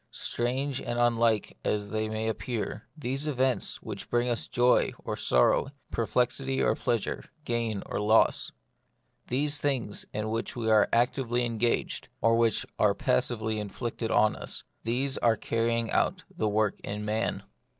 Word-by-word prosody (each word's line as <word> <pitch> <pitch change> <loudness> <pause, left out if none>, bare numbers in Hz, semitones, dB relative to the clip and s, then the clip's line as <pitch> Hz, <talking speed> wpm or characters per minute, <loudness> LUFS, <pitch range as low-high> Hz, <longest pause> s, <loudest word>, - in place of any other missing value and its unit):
Strange 130 +3 -1
and 120 0 -3
unlike 115 -2 +2
it - - -23
as 105 -1 -1
they 110 0 -1
may 110 0 -2
appear, 110 -1 -3
these 135 +1 -2
events 130 -3 0
which - - -7
bring 120 +1 +1
us 120 -2 0
joy 125 0 +3
or - - -2
sorrow, 60 - +3 0.2
perplexity 125 +3 0
or - - +3
pleasure, 120 -4 -1 0.2
gain 115 -4 -1
or - - -3
loss; 110 +2 +3 0.8
these 145 +3 0
things 130 -8 -1
in 105 +1 -3
which 115 +1 -2
we 115 -2 0
are 105 -1 +5
actively 120 0 +1
engaged, 115 0 0
or 115 +1 +4
which 115 -2 +2
are - - +4
passively 110 - 0
inflicted 115 +2 -4
on 110 -1 +4
us; - - -4 0.2
these 130 +4 0
are 115 -1 +4
the - - -19
carrying 115 0 0
out - - +1
of - - -23
this 110 - +1
work 105 -1 +1
in 105 +1 -5
man. 110 +2 -1
115 Hz, 160 wpm, -28 LUFS, 110-125 Hz, 0.8 s, are